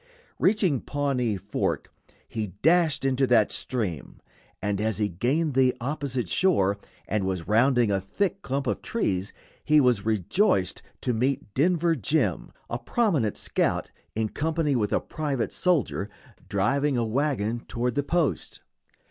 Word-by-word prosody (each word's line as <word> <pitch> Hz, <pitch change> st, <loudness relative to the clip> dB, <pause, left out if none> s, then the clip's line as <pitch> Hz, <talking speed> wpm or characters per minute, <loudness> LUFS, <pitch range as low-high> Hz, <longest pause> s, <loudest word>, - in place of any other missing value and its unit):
Reaching 185 Hz, -, +2 dB
Pawnee 130 Hz, -7 st, -1 dB
Fork, 95 Hz, -, -3 dB, 0.3 s
he 110 Hz, -2 st, -3 dB, 0.2 s
dashed 165 Hz, -3 st, +3 dB
into 135 Hz, 0 st, +2 dB
that 120 Hz, -4 st, +4 dB
stream, 100 Hz, -, -3 dB, 0.4 s
and 105 Hz, 0 st, -1 dB
as 110 Hz, -1 st, 0 dB
he 105 Hz, -1 st, +1 dB
gained 135 Hz, -, 0 dB
the 130 Hz, 0 st, +3 dB
opposite 130 Hz, -3 st, -2 dB
shore, 100 Hz, -, +2 dB, 0.3 s
and 105 Hz, -1 st, 0 dB
was 95 Hz, -3 st, -3 dB
rounding 120 Hz, +1 st, +3 dB
a 95 Hz, -1 st, +1 dB
thick 195 Hz, -, -2 dB
clump 135 Hz, -3 st, -2 dB
of -, -, -1 dB
trees, 100 Hz, -, -1 dB, 0.3 s
he 150 Hz, 0 st, +5 dB
was 125 Hz, -6 st, +3 dB
rejoiced 110 Hz, -, +1 dB, 0.2 s
to 125 Hz, -, 0 dB
meet 125 Hz, -1 st, -1 dB
Denver 170 Hz, +3 st, +2 dB
Jim, 150 Hz, +3 st, 0 dB, 0.2 s
a -, -, -3 dB
prominent 165 Hz, -, 0 dB
scout, -, -, -1 dB, 0.2 s
in 110 Hz, 0 st, 0 dB
company 155 Hz, 0 st, 0 dB
with 105 Hz, -4 st, 0 dB
a -, -, +3 dB
private 140 Hz, -6 st, -3 dB
soldier, 155 Hz, -, 0 dB, 0.4 s
driving 135 Hz, +8 st, +1 dB
a 120 Hz, -, +1 dB
wagon 120 Hz, -2 st, 0 dB
toward 120 Hz, +1 st, -1 dB
the 145 Hz, -, +1 dB
post. 145 Hz, -, -1 dB
125 Hz, 140 wpm, -26 LUFS, 105-150 Hz, 0.4 s, he